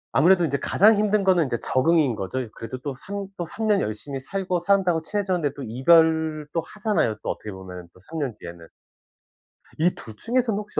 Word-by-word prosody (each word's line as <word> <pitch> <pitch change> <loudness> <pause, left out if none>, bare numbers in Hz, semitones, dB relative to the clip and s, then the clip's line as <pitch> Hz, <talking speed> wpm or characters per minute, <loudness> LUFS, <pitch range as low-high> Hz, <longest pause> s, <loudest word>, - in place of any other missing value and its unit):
아무래도 180 +1 +5
인제 140 -1 -1
가장 210 +9 +4
힘든 210 -1 +2
거는 180 -5 +3
인제 120 -3 -2
적응인 150 -2 +2
거죠. 100 +5 -4
이 125 - -6
그래도 115 +4 -7
또 135 +2 -5
3 200 +9 -6
또 175 - -4
3 220 +5 -5
년 210 -2 +3
열심히 135 +6 -4
살고 185 +4 -2
사람들하고 180 -2 +2
친해졌는데 180 -6 -1
또 140 - -7
이별 160 +4 +3
또 165 - 0
하잖아요, 210 - -1
또 - - -3
어떻게 105 - -7
보면은 90 -2 -9
또 90 - -20
3 160 0 -5
년 130 -7 -2
뒤에는. 85 -1 -10 1.1
이 170 +3 +3
2 110 - -11
중에서는 230 - 0
혹시 210 0 -4
160 Hz, 380 characters per minute, -24 LUFS, 130-195 Hz, 1.1 s, 아무래도